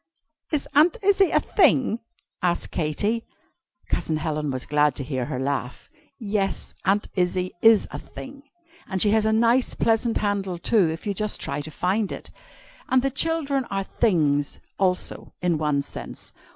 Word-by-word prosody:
"Is 300 -3 -1
Aunt 315 +9 +5
Izzie 390 -1 +4
a - - +3
'thing?'" 260 - +3 0.4
asked 175 -1 0
Katy. 205 +9 -1 0.6
Cousin 155 - -1
Helen 155 -1 -2
was 130 -1 -3
glad 150 -2 +2
to 140 - -3
hear 130 -3 -2
her 125 - -4
laugh. 135 - -3 0.3
"Yes 200 -4 -2
Aunt 200 +2 +2
Izzie 180 0 0
is 225 -2 +6
a - - -5
thing 275 +1 -10 0.5
and 190 -2 -2
she 205 +2 +5
has 220 0 +3
a - - +3
nice 235 +3 +3
pleasant 225 0 +1
handle 200 -3 -1
too, 190 -1 +3
if 160 +1 -5
you 205 - 0
just 210 +2 -1
try 140 +1 -3
to 150 - -8
find 190 +7 -1
it. - - -7 0.6
And 260 -1 +3
the 275 - +1
children 280 -2 0
are 195 -2 -2
'things,' 150 -10 +1 0.2
also, 185 -2 -1
in 175 -3 0
one 150 -2 +1
sense. - - -8
195 Hz, 165 wpm, -24 LUFS, 155-230 Hz, 0.6 s, is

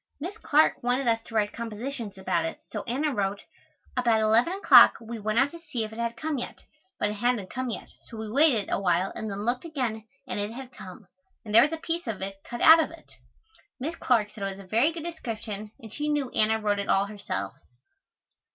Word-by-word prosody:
Miss 355 +8 -5
Clark 305 -4 +3
wanted 245 +2 0
us 225 -1 +2
to 225 - -10
write 210 -1 +1
compositions 230 -1 -5
about 185 -3 0
it 165 - -4
so - - -3
Anna 280 +5 0
wrote, 200 -2 -2 0.5
"About 235 -3 +3
eleven 225 +9 +3
o'clock 395 - +7
we 230 -1 -7
went 215 +1 -1
out 270 +3 +4
to 335 - -10
see 290 -9 -3
if 215 0 -6
it 225 - -9
had 235 0 -2
come 310 -1 -2
yet, - - -6 0.4
but 210 - +1
it 210 0 -7
hadn't 240 -6 0
come 255 0 -3
yet, 230 - -6
so 230 - -12
we 220 0 -5
waited 265 -6 +4
awhile 185 -1 +1
and 220 - -5
then 200 +1 -4
looked 245 +1 0
again 245 -9 -3 0.2
and - - -3
it 205 +2 -3
had 260 +1 -9
come, 190 +3 -11 0.4
and 210 - -6
there 230 - +9
was 295 - +3
a 325 - -2
piece 330 -1 -3
of 220 -4 -3
it 195 0 -6
cut 240 - -7
out 325 +1 +9
of 315 - -2
it." 330 -1 -15 0.7
Miss 310 +6 -3
Clark 220 -8 +1
said 215 - -11
it 195 -1 -2
was 195 - -11
a - - -20
very 230 - +3
good 325 -1 -7
description 220 -10 -5
and 220 -4 -11
she 300 0 -2
knew 290 -4 0
Anna 220 +1 +2
wrote 205 -1 0
it 200 - -4
all 195 +1 +3
herself. 205 0 -4
230 Hz, 225 wpm, -27 LUFS, 210-275 Hz, 0.7 s, there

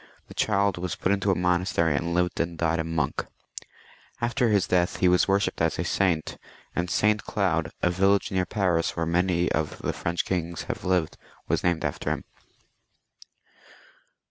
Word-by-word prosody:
The - - -10
child 100 -3 +1
was 90 0 -3
put 95 - 0
into 100 0 +1
a 95 - +3
monas 90 +1 0
tery, 80 -3 +2
and 85 +4 -1
lived 90 0 0
and 85 0 -1
died 85 0 +1
a - - +1
monk. 80 -4 -1 1.0
After 120 +1 +1
his 100 -3 +3
death 90 -1 +1
he 90 - +3
was 90 0 +4
worshipped 100 0 +1
as - - +1
a - - -1
saint, 90 -5 0 0.4
and 90 0 -1
St. 105 +3 +2
Cloud, 85 -6 0
a 90 - +3
village 95 +2 +2
near 95 -1 0
Paris, 90 -6 0
where 85 - -1
many 90 +1 +1
of 75 0 -1
the - - -3
French 85 +1 -2
kings 85 -2 -2
have - - -5
lived, 90 -3 0 0.3
was - - 0
named 85 -2 +1
after 75 - -2
him. - - -2
90 Hz, 175 wpm, -26 LUFS, 85-95 Hz, 1.0 s, was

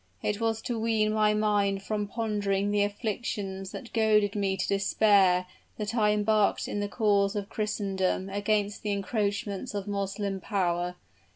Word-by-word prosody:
It 210 +1 -1
was 225 -1 0
to 235 -2 -2
wean 220 -1 +1
my 215 -1 +3
mind 205 -2 +1
from 210 0 -2
pondering 205 -3 -1
on 205 - +3
afflictions 205 -2 -3
that 245 - -9
goaded 215 -3 +3
me 195 -2 0
to 185 - -1
despair 195 -2 +3 0.3
that 210 0 -3
I 215 -3 +3
embarked 210 0 +2
in 205 - -3
the 205 0 -2
cause 200 -2 +2
of 205 -1 -3
Christendom 195 -3 -1
against 205 +1 -1
the 210 -1 -1
encroachments 200 0 -2
of 200 0 -3
Moslem 200 0 -2
power. 180 -3 -1
205 Hz, 155 wpm, -28 LUFS, 195-215 Hz, 0.3 s, my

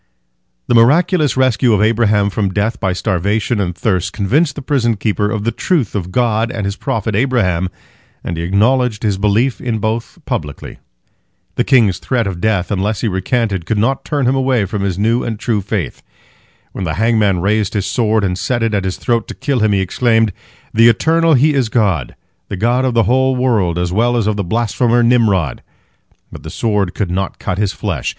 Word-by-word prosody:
The - - 0
miraculous 150 +6 +3
rescue 125 -2 +2
of 105 - +2
Abraham 105 -2 +2
from 100 -1 -1
death 105 +5 -1
by 95 -4 0
starvation 100 +5 -1
and 90 -3 -2
thirst 90 -1 -1
convinced 140 - +1
the 145 - -7
prison 120 -5 0
keeper 105 0 -1
of 105 -1 -3
the 115 - 0
truth 155 - -1
of 90 -3 -4
God 115 0 +1
and 110 -5 -4
His 100 0 -2
prophet 110 0 -3
Abraham, 100 -8 +1 0.5
and 85 - -4
he 80 - -4
acknowledged 110 +5 +1
his 100 -3 0
belief 110 +5 +1
in 120 -3 -2
both 110 +2 -3
publicly. 75 -2 -5 0.7
The - - 0
king's 115 -9 +3
threat 120 -4 -1
of 90 -3 -4
death 105 -4 0
unless 100 +1 -1
he - - 0
recanted 95 -1 -1
could 110 - 0
not 120 +6 0
turn 145 -3 -1
him 125 - +2
away 130 -5 +1
from 100 +1 -4
his 95 -3 -2
new 115 +4 +1
and 115 -2 -3
true 105 -1 -1
faith. 100 -4 -4 0.7
When 95 - -6
the 80 -3 -2
hangman 105 -3 +2
raised 105 +3 0
his 100 -2 0
sword 110 +2 +1
and 90 -1 -1
set 120 -3 -1
it 115 -1 0
at 100 -2 0
his 95 - -3
throat 115 -2 -1
to - - -8
kill 140 -3 -1
him, 110 -1 +2
he 100 -1 +2
exclaimed, 115 +2 +1 0.4
"The 115 +1 +6
Eternal 160 +7 +3
He 150 +4 +3
is 130 -5 0
God, 95 - 0 0.3
the 100 - -4
God 120 +6 +1
of 125 -2 -1
the 115 - +4
whole 130 +2 +2
world 110 -10 +1
as 90 0 -1
well 120 +4 +2
as 115 - 0
of 105 0 0
the 100 - -2
blasphemer 120 +4 +1
Nimrod." 110 - +2 0.7
But - - -10
the - - -8
sword 105 -5 -1
could 95 -5 -2
not 95 +1 -2
cut 90 - -3
his 105 -2 +1
flesh. - - -3
110 Hz, 200 wpm, -16 LUFS, 100-120 Hz, 0.7 s, The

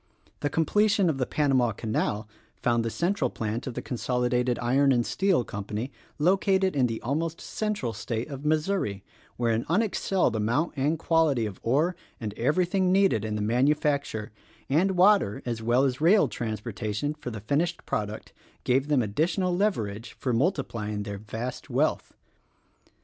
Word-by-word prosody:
The 145 - -1
completion 200 +3 +2
of 135 - -5
the 130 - 0
Panama 130 -6 +2
Canal 110 0 -2 0.3
found 120 -1 +1
the 115 - -1
central 170 - 0
plant 110 +3 -4
of 125 - -5
the - - -4
Consolidated 125 0 0
Iron 135 +3 +3
and 120 -2 +2
Steel 190 -9 +2
Company 105 +5 -5 0.3
located 190 +2 +2
in 130 -3 +3
the 115 -1 -3
almost 160 +6 -2
central 210 - -3
state 110 +3 -3
of 140 -2 -7
Missouri, 155 - 0 0.3
where 115 -1 +1
an 115 +1 0
unexcelled 190 - +1
amount 120 +10 0
and 145 +4 +1
quality 160 -7 +2
of 100 -3 -6
ore 150 +10 +1 0.2
and 105 -3 -4
everything 180 - +1
needed 190 - +3
in 110 -1 -2
the 105 - -1
manufacture, 135 -1 +1 0.4
and 180 +6 +2
water 190 - +4
as 115 -2 -3
well 120 +4 +3
as 130 0 0
rail 190 +6 +5
trans 110 -3 -4
portation 110 +6 -3
for 150 -4 -6
the 110 -3 -6
finished 160 - -1
product, 105 0 -4 0.3
gave 130 +3 +2
them 145 -5 +3
additional 170 - 0
leverage 115 - -1
for 125 - -2
multiplying 115 - -1
their 100 -1 -6
vast 110 +4 -6
wealth. - - 0
130 Hz, 155 wpm, -27 LUFS, 115-165 Hz, 0.4 s, rail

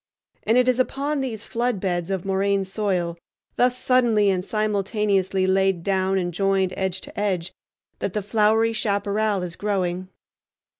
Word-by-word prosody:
And 225 +3 +2
it 250 0 +4
is 255 0 +2
upon 280 +3 0
these 230 -5 -4
flood 240 -3 -1
beds 175 -2 -2
of 190 -1 -2
moraine 195 0 +1
soil, 185 -4 -2 0.4
thus 250 0 +2
suddenly 235 -6 +3
and 180 -1 -1
simultaneously 200 -2 0
laid 190 -2 +2
down 190 0 +1
and 175 -2 -1
joined 195 0 +1
edge 190 -1 -2
to - - -8
edge, 190 -4 -1 0.5
that 190 - -3
the 210 - -2
flowery 220 +2 +2
chaparral 205 -2 0
is 175 -2 -5
growing. 185 -3 -2
200 Hz, 150 wpm, -23 LUFS, 190-220 Hz, 0.5 s, it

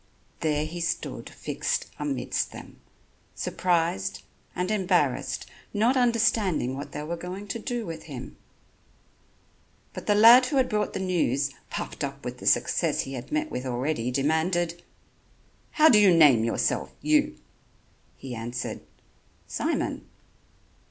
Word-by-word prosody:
There 150 -1 0
he 170 +2 -6
stood 170 - -3
fixed - - -2
amidst 290 -2 -2
them, - - -12 0.5
surprised 130 - -1 0.3
and 180 +3 -1
embarrassed, 180 -10 +1 0.3
not 230 +6 +3
understanding 220 - +2
what 140 +2 -7
they 150 - -5
were 165 +3 -3
going 180 +4 -7
to 230 - -3
do 240 -1 -3
with 165 -3 -7
him. 130 -5 -8 1.6
But - - -8
the 205 - +4
lad 235 +4 +8
who 280 - -2
had 260 - +3
brought 210 0 -1
the - - -3
news, 145 -7 0 0.2
puffed - - -5
up - - -5
with - - -5
the - - -5
success - - +2
he 135 - -6
had 125 -2 -7
met 310 +1 -1
with 125 - -3
already, 125 0 -1
demanded: 165 +6 0 0.9
"How 310 0 +6
do 220 -8 +7
you 200 -3 +6
name 145 -9 +6
yourself, 115 - 0
you?" 305 0 +2 0.8
He 130 -2 -7
answered: 120 +1 -5 0.6
"Simon." - - -2
175 Hz, 135 wpm, -26 LUFS, 135-215 Hz, 1.6 s, lad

